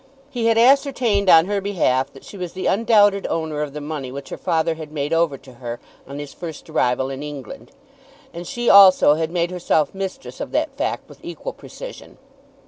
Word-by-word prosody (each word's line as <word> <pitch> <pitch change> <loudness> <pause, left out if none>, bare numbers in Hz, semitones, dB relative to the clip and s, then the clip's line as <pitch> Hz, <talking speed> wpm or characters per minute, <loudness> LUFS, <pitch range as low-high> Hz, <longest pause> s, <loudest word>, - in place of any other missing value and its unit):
He 235 -2 -1
had 225 -1 +3
ascertained 245 -5 +3
on 165 -1 +7
her 200 +1 -1
behalf 140 -9 0
that 135 - -14
she - - -12
was 180 -3 -6
the 185 - -5
undoubted 205 -2 +3
owner 160 -2 -2
of 145 -2 -4
the 150 - -5
money 145 -3 -5
which 140 0 -8
her - - -6
father 165 -2 0
had 155 -2 -9
made 145 +1 -2
over 165 -4 +1
to 130 0 -16
her 120 -1 -5 0.3
on 140 +1 -8
his 145 -1 -7
first 165 -4 -8
arrival 125 +2 0
in 135 +1 -6
England, 150 - -8 0.6
and 170 0 -7
she 240 0 -4
also 190 -6 +8
had 160 +1 -1
made 170 0 -1
herself 165 -4 0
mistress 195 +7 -6
of - - -5
that - - -1
fact - - -3
with - - -15
equal - - -6
precision. - - -11
165 Hz, 200 wpm, -21 LUFS, 145-200 Hz, 0.6 s, also